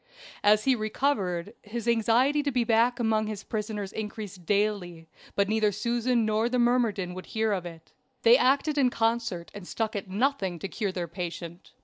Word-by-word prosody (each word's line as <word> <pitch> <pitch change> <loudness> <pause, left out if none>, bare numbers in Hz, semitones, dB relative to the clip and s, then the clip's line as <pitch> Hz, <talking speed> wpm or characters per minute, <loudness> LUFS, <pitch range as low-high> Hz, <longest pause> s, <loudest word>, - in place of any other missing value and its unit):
As 210 +1 +5
he 265 - +4
recovered, 215 -5 -1
his 230 +2 -6
anxiety 235 +5 +3
to 290 - -1
be 250 -2 +1
back 235 +2 +2
among 220 -2 +1
his 210 -2 -5
prisoners 210 -2 -4
increased 205 -5 -6
daily, 200 -5 0 0.3
but 200 0 +2
neither 215 0 +2
Susan 235 +3 0
nor 220 +2 +1
the 250 - 0
myrmidon 235 -7 +1
would 185 0 -8
hear 220 -1 0
of 185 -3 -2
it. 165 -1 -13 0.3
They 230 +1 +8
acted 280 +3 +2
in 260 -2 +4
concert, 225 -7 -1
and 200 -3 -9
stuck 220 -1 -2
at 200 -1 -4
nothing 200 -4 0
to 180 - -5
cure 200 0 -2
their 180 -2 -4
patient. 170 0 -7
215 Hz, 175 wpm, -27 LUFS, 195-235 Hz, 0.3 s, They